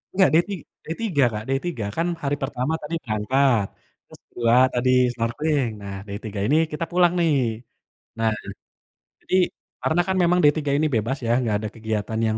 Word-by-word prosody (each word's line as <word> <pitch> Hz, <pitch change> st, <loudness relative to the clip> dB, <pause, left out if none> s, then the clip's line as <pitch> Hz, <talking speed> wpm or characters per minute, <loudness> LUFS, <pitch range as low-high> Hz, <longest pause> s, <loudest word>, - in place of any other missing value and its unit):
Nggak 190 Hz, -5 st, +5 dB
day 165 Hz, -, +6 dB
ti 200 Hz, -, -2 dB, 0.3 s
day, 160 Hz, -, -4 dB
3 175 Hz, -12 st, +2 dB
Kak, 105 Hz, 0 st, -4 dB
day 135 Hz, 0 st, +1 dB
3, 120 Hz, -12 st, -3 dB
kan 165 Hz, +1 st, +1 dB, 0.2 s
hari 145 Hz, 0 st, +1 dB
pertama 135 Hz, +2 st, -2 dB
tadi 150 Hz, +3 st, -4 dB
berangkat, 115 Hz, +1 st, +2 dB, 0.4 s
terus -, -, -16 dB
2 115 Hz, 0 st, +2 dB, 0.2 s
tadi 125 Hz, +1 st, +1 dB, 0.2 s
snorkeling, 125 Hz, +3 st, 0 dB
nah 100 Hz, -1 st, -6 dB
day 100 Hz, 0 st, -5 dB
3 105 Hz, -2 st, -5 dB
ini 140 Hz, -, +3 dB, 0.2 s
kita 165 Hz, +2 st, -2 dB
pulang 175 Hz, 0 st, +4 dB
nih. 165 Hz, -3 st, +3 dB, 0.9 s
Nah, 115 Hz, 0 st, +2 dB, 0.9 s
jadi -, -, -1 dB, 0.5 s
karena 165 Hz, +2 st, +2 dB
kan 190 Hz, -, +1 dB
memang 175 Hz, +1 st, +3 dB
day 145 Hz, -, +7 dB
3 145 Hz, -2 st, -1 dB
ini 155 Hz, +1 st, +2 dB
bebas 115 Hz, +5 st, 0 dB
ya, 115 Hz, -, +1 dB
nggak 110 Hz, -4 st, 0 dB
ada 110 Hz, -, -3 dB
kegiatan 110 Hz, 0 st, -3 dB
yang 110 Hz, 0 st, 0 dB
135 Hz, 185 wpm, -23 LUFS, 110-160 Hz, 0.9 s, day